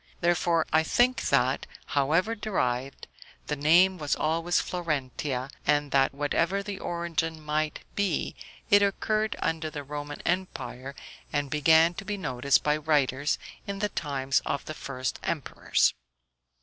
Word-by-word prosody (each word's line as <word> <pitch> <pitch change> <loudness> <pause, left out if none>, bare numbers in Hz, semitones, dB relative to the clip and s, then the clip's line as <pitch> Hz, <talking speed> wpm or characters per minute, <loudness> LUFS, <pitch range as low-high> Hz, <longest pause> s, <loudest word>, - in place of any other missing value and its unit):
Therefore 170 -1 +2
I 160 - +6
think 245 +9 +2
that, 130 -1 +2 0.3
however 160 +10 +2
derived, 135 - -2 0.4
the 150 - -2
name 175 +6 +4
was 150 -2 0
always 165 +3 +1
Florentia, 140 -5 -2
and 145 -1 +1
that 135 -1 +4
whatever 165 +7 0
the 200 -1 -5
origin 165 -2 -2
might 155 0 -2
be, 200 -6 0 0.4
it 205 0 +7
occurred 215 +2 +1
under 160 -2 -1
the 145 -2 -6
Roman 145 +1 -6
empire, 155 -7 -3 0.4
and 145 -2 -1
began 160 +3 +5
to 195 - -7
be 205 0 -3
noticed 135 -5 +1
by 150 0 +2
writers 145 -2 +1 0.3
in 200 0 -3
the 205 +1 -1
times 135 -5 0
of - - -3
the 155 - -5
first 130 -3 -4
emperors. - - +1
155 Hz, 135 wpm, -28 LUFS, 140-175 Hz, 0.4 s, it